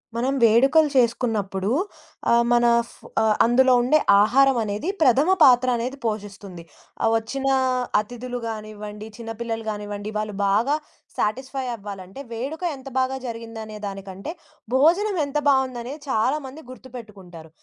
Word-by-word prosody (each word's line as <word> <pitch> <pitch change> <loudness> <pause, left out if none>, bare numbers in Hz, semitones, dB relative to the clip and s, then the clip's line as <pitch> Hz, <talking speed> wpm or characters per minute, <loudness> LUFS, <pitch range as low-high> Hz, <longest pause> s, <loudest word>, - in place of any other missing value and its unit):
మనం 255 +3 0
వేడుకలు 270 +8 +5
చేసుకున్నప్పుడు 215 -5 0 0.6
ఆహ్, 235 0 +5
మన 240 0 +4 0.2
ఫ - - -17 0.3
ఆహ్, 220 -1 +3
అందులో 255 +2 +4
ఉండే 260 +6 +3 0.2
ఆహారం 270 +4 +4
అనేది 210 - -3
ప్రథమ 275 +3 +4
పాత్ర 255 -2 +6
అనేది 250 +4 -4
పోషిస్తుంది. 200 -5 -5 0.4
ఆ - - +3
వచ్చిన 265 +5 -4 0.5
అతిధులు 245 +3 -5
గానివ్వండి, 215 -1 -7
చిన్నపిల్లలు 225 -1 -5
గానివ్వండి, 205 0 -5
వాళ్ళు 215 -1 -3
బాగా 225 +9 +2 0.4
శాటిస్ఫై 260 +5 -2
అవ్వాలంటే 195 0 -9
వేడుక 275 +9 -5
ఎంత 270 0 -10
బాగా 260 +1 0
జరిగిందనే 225 -2 -7
దానికంటే, 195 +5 -7 0.4
భోజనం 355 +9 +3
ఎంత 280 +1 -3
బావుందనేది 265 +1 -1
చాలామంది 265 +5 -1
గుర్తుపెట్టుకుంటారు. 210 -11 -12
235 Hz, 120 wpm, -23 LUFS, 210-265 Hz, 0.6 s, పాత్ర